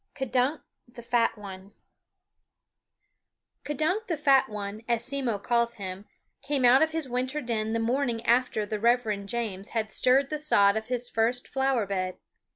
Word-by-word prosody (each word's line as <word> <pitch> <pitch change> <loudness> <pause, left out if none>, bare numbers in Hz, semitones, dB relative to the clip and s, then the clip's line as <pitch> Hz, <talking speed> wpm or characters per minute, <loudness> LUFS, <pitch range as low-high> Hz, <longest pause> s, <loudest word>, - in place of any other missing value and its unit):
K'DUNK 265 +2 0 0.3
THE 240 -1 -11
FAT 235 -1 +1
ONE 195 0 -10 1.9
K'dunk 315 - -1
the 330 - -1
Fat 275 -4 +4
One, 210 0 -6
as 235 -1 0
Simmo 260 -5 -1
calls 235 +3 0
him, 190 -1 -6 0.4
came 275 -2 0
out 250 +2 +6
of 315 - +4
his 320 -3 -3
winter 255 +4 -2
den 225 -4 -2
the 230 - 0
morning 240 0 -1
after 240 -3 +2
the 210 0 -4
Reverend 220 -3 +1
James 205 -4 -3
had 215 -1 -1
stirred 270 +2 +3
the 305 - -2
sod 200 -10 +4
of 220 0 -3
his 245 -1 -2
first 235 +2 0
flower 265 -4 0
bed. 185 -2 -3
240 Hz, 160 wpm, -27 LUFS, 215-265 Hz, 1.9 s, out